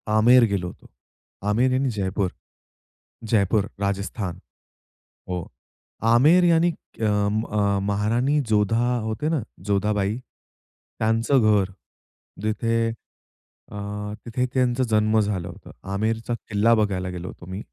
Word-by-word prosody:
आमेर 115 +4 +6
गेलो. 90 -3 -2 0.8
आमेर 120 +5 +3
यानी 130 +1 +1
जयपूर. 100 -2 -1 0.9
जयपूर, 105 -1 +1
राजस्थान 100 -1 -3 0.9
हो. 90 -2 -3 0.7
आमेर 155 +9 +6
यानी 170 0 +4 0.3
अ, - - +2
अ, 105 -1 +1
महाराणी 115 +8 +1
जोधा 105 +1 +2 0.3
होते 110 +7 -2
ना, 160 -4 0 0.3
जोधाबाई, 105 +1 +1 0.8
त्यांचं 115 +5 +2
घर. 105 -3 +3 0.7
जिथे 115 +1 0 0.8
अ, 105 - -7 0.5
तिथे 125 +2 -1
त्यांचा 125 -1 +2
जन्म 110 0 +3
झालं 100 -5 -1
होतं. 85 - -11 0.2
आमेरचा 110 +3 -1 0.2
किल्ला 110 +2 +3
बघायला 95 -4 0
गेलो 90 0 -6
होतो 90 - -10
मी 95 - -4
110 Hz, 110 wpm, -24 LUFS, 100-115 Hz, 0.9 s, आमेर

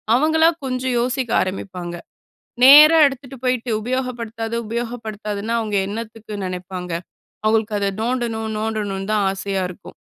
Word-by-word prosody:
அவங்களா 320 +4 +4 0.2
கொஞ்சம் 255 -1 -1
யோசிக்க 250 0 -1
ஆரம்பிப்பாங்க. 185 -2 -5 0.7
நேரா 300 +4 +10
எடுத்துட்டு 270 0 -5
போயிட்டு 250 -1 0
உபயோகப்படுத்தாத, 235 -2 -3
உபயோகப்படுத்தாதன்னா, 225 -2 -4
அவங்க 210 -2 -2
என்னத்துக்கு 220 0 -7
நெனைப்பாங்க? 180 0 -6 0.6
அவுங்களுக்கு 215 -1 +1
அத 200 - 0
நோண்டணும் 230 -2 -2
நோண்டணும்ன்னு 210 -2 -3
தான் 205 -2 +2
ஆசையா 195 -1 -2
இருக்கும். 185 +2 -11
225 Hz, 115 wpm, -21 LUFS, 205-250 Hz, 0.7 s, நேரா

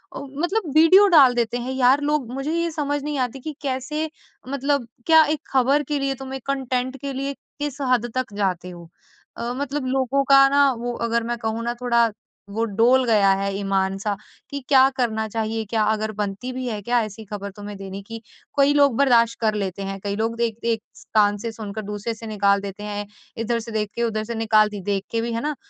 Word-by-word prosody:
अ, - - -4
मतलब 340 +10 -2
वीडियो 370 +6 +7
डाल 280 -8 +7
देते 235 0 0
हैं 245 +2 -4
यार 260 +2 +4
लोग। 290 -4 -1
मुझे 275 +3 -3
ये 335 0 0
समझ 290 -2 -2
नहीं 295 -1 -3
आती 255 +1 -2
कि 305 +4 -6
कैसे? 285 +3 -2 0.4
मतलब 280 -2 0 0.2
क्या 320 -1 +8
एक 300 +1 -1
खबर 270 +3 +3
के 290 0 -2
लिए 275 0 -1
तुम 265 0 -8
एक 265 - -8
कंटेंट 260 -1 -1
के 280 -1 -4
लिए 275 +1 -3 0.3
किस 290 -2 -3
हद 240 -2 +1
तक 255 -5 -2
जाते 180 -3 -1
हो? 175 -2 -11 0.5
अ, 235 +1 -3
मतलब 285 0 -3
लोगों 270 +1 +1
का 275 0 +8
ना 280 0 +4
वो 240 0 -3 0.2
अगर 235 0 +1
मैं 240 +1 -2
कहूँ 225 0 -3
ना 240 - 0
थोड़ा 235 -2 +3 0.4
वो 225 +3 -2
डोल 230 +5 +3
गया 205 -4 +4
है 200 0 -1
ईमान 195 -1 0
सा, 205 +1 -2 0.3
कि 280 - -4
क्या 265 -1 +6
करना 220 -3 0
चाहिए 220 0 -2
क्या 220 -1 +1
अगर 220 0 -1
बनती 210 +4 -4
भी 255 0 -4
है 215 -3 -3
क्या 240 +3 +2
ऐसी 215 +1 -8
खबर 200 0 -6
तुम्हें 205 0 -8
देने 195 0 -7
की? 225 +2 -8 0.4
कई 280 +1 +5
लोग 285 -4 +4
बर्दाश 235 -4 +4
कर 220 -1 +2
लेते 195 -1 -3
हैं। 195 0 -5
कई 200 0 -2
लोग 225 +2 -1
देखते 235 0 -1
एक 220 - -4
स - - -16
कान 205 -1 +4
से 230 +2 -4
सुनकर 215 -1 -6
दूसरे 210 +2 -4
से 225 +1 -9
निकाल 200 -2 +2
देते 200 +1 -7
हैं 205 0 -4 0.4
इधर 230 +1 0
से 230 0 -8
देख 215 -2 -1
के 235 - -1
उधर 215 -2 -1
से 235 +1 -5
निकाल 215 -1 +3
दी 205 -1 -7
देख 195 0 -1
के 230 - 0
भी, 235 0 -3
है 230 - -2
ना? 300 +1 -2
235 Hz, 220 wpm, -23 LUFS, 210-275 Hz, 0.5 s, क्या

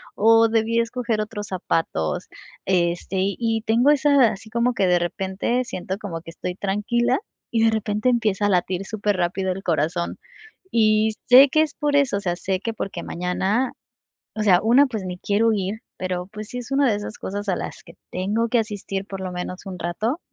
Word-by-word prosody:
o 225 +1 +5
debí 225 +1 +1
escoger 230 -1 -1
otros 210 -1 -4
zapatos, 165 - -2 0.4
este, 175 0 0
y 195 +1 0
y 225 -1 0
tengo 235 +5 +3
esa, 285 -4 +5
así 220 +2 -9
como 235 +2 +1
que 195 -6 +1
de 180 0 +4
repente 190 +7 -1
siento 190 -3 -4
como 185 -6 -6
que 165 - -11
estoy 180 +1 -5
tranquila 225 +6 0 0.3
y 225 -1 +2
de 225 - +5
repente 215 +2 0
empieza 215 -4 +1
a - - +1
latir 185 0 0
superrápido 190 -3 -1
el 195 - -8
corazón, 170 +1 -1 0.5
y 215 -1 +3 0.2
sé 260 +3 +9
que 310 +4 +3
es 310 - -4
por 295 -1 0
eso, 275 -7 +2
o - - -4
sea, 175 -3 -1
sé 190 -1 -2
que 230 - -3
porque 195 -3 -5
mañana, 190 +8 -1 0.6
o 215 - -2
sea, 185 -4 +5
una, 245 +6 +5
pues 220 -7 -5
ni 180 -1 -5
quiero 220 +4 +2
ir, 205 +2 -3 0.2
pero 180 -1 -3
pues 210 +1 -8
sí 250 - -8
es 245 +1 -8
una 275 -3 +3
de 205 - +1
esas 205 +1 -7
cosas 205 +2 -5
a 180 - 0
las - - -6
que - - -13 0.2
tengo 210 +6 -1
que 240 - +2
asistir 205 -2 -4
por 195 -2 -7
lo 185 -1 -4
menos 180 +2 -6
un 185 -2 -6
rato, 215 - -2
210 Hz, 200 wpm, -23 LUFS, 185-230 Hz, 0.6 s, sé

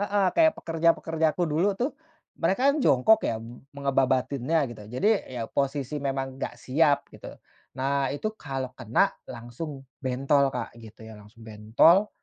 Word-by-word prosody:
Heeh, 205 -1 +1
kayak 320 -1 +4
pekerja-pekerja 165 -1 0
aku 180 - +1
dulu 170 +6 0
tuh, 250 +8 -1 0.5
mereka 245 +12 +3
kan 300 - -2
jongkok 220 - +4
ya 115 - -1
mu 115 +2 -10 0.2
mengebabatinnya 135 +1 +1
gitu, 110 - -12
jadi 130 - +1 0.2
ya 125 -3 -5
posisi 140 +2 -2
memang 135 -1 -3
nggak - - -4
siap 145 +1 +2
gitu. - - -11 0.4
Nah 135 +1 0
itu 180 +11 -3
kalau 135 -6 -5
kena 120 -3 +1 0.2
langsung 130 +4 -8 0.2
bentol 135 +2 +2
Kak 125 -3 -5
gitu 110 0 -13
ya, 110 - -10
langsung 110 +2 -16
bentol, 110 - +3
140 Hz, 150 wpm, -26 LUFS, 125-165 Hz, 0.5 s, kayak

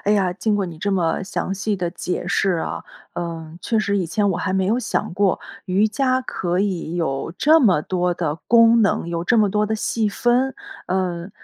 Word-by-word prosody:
哎 205 - +3
呀， 195 -4 +2
经 210 +4 -1
过 200 -2 -1
你 165 -3 -9
这 200 +5 -1
么 175 -1 0
详 190 0 -3
细 205 +1 -1
的 175 -2 -2
解 180 0 -4
释 195 +1 +1
啊， 165 - -3 0.3
嗯， 165 -1 -6
确 225 - 0
实 200 -1 0
以 185 -3 0
前 205 +4 0
我 180 - -1
还 185 +1 -2
没 190 -1 +1
有 225 +5 +2
想 245 - -2
过， 195 0 +2 0.3
瑜 190 +3 +3
伽 255 +3 +1
可 180 -8 -2
以 180 -5 -2
有 160 -2 -2
这 315 +3 +6
么 190 - +4
多 180 +2 -1
的 165 -4 -2
功 230 0 +6
能， 195 -4 +1
有 170 0 -2
这 235 +5 +3
么 210 -1 +4
多 210 +2 +1
的 220 +1 -1
细 220 0 0
分。 245 +5 +1 0.3
呃， 180 -1 -2
190 Hz, 225 characters per minute, -21 LUFS, 175-215 Hz, 0.3 s, 这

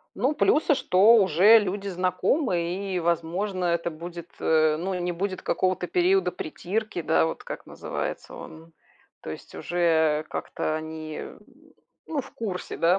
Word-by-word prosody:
Ну, 260 +8 +1
плюсы, 300 +1 +3
что 205 -1 +5
уже 200 +2 +6
люди 200 -1 -3
знакомы 185 - 0 0.3
и, - - +1
возможно, 175 +3 -1
это 170 0 0
будет, 170 +1 -8
э, 155 -1 +3
ну, 190 +4 -2
не 180 0 -2
будет 185 +2 -3
какого-то 185 -1 0
периода 180 +1 +2
притирки, 195 +5 -4
да, 80 - +2
вот, 80 - -4
как - - -7
называется - - -5
он. 160 +1 -11 0.5
То - - -6
есть 80 - -9
уже 160 -3 +1
как-то 155 - -3
они, 155 0 -6 0.8
ну, 305 -3 -2
в 270 - -12
курсе, 195 -5 -5
да, 175 +3 +3
180 Hz, 145 wpm, -26 LUFS, 165-195 Hz, 0.8 s, уже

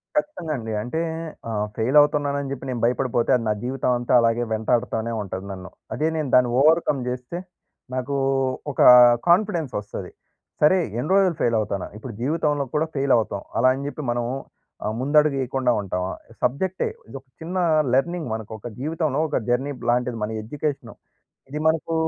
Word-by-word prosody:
ఖచ్చితంగా 295 - -1
అండి. 110 -2 -5
అంటే 125 +9 -3 0.5
ఆహ్, 105 -1 -1
ఫెయిల్ 125 +6 +2
అవుతున్నానని 145 -1 0
చెప్పి 135 0 -6
నేను 120 -3 -3
భయపడిపోతే 120 -1 +1
అది 120 - -1
నా - - +3
జీవితం 130 0 -1
అంతా 120 - -1
అలాగే 115 +1 +2
వెంటాడుతూనే 115 0 0
ఉంటది 95 -1 -6
నన్ను. 95 -1 -8 0.3
అదే 155 - 0
నేను 150 -3 -2
దాన్ని 125 -1 +5
ఓవర్‌కమ్ 155 -2 +3
జేస్తే, 125 +6 -4 0.6
నాకు 130 +2 -2 0.6
ఒక - - -11 0.5
కాన్ఫిడెన్స్ 175 - +2
వస్తది. 100 -2 -7 0.5
సరే 150 +5 +6 0.2
ఎన్ని 150 - -3
రోజులు 190 -4 +4
ఫెయిల్ 115 -1 +2
అవుతాన? 100 -2 -2
ఇప్పుడు 115 +2 -8
జీవితంలో 150 0 0
కూడా 155 +2 +2
ఫెయిల్ 135 0 0
అవుతాం, 105 -3 -2 0.2
అలా 125 - +4
అని 140 +1 -5
జెప్పి 150 +1 -5
మనం 120 0 -1 0.6
ఆహ్, 105 - -1
ముందడుగు 150 +1 +3
ఏయకుండా 130 -1 0
ఉంటామా? 95 -1 -3 0.3
సబ్జెక్టే. 180 +10 0 0.2
ఇదొక 135 +2 -9 0.2
చిన్న 175 +3 -4 0.4
లెర్నింగ్ 170 +4 +1
మనకొక 110 0 -6
జీవితంలో 155 0 -1
ఒక 150 - -1
జర్నీబ్ 125 0 -1
లాంటిది 125 0 +1
మన 105 - -2
ఎడ్యుకేషన్. 145 +5 -4 0.6
ఇది 150 +2 -4
మనకు 160 +1 0
130 Hz, 155 wpm, -23 LUFS, 115-150 Hz, 0.6 s, సరే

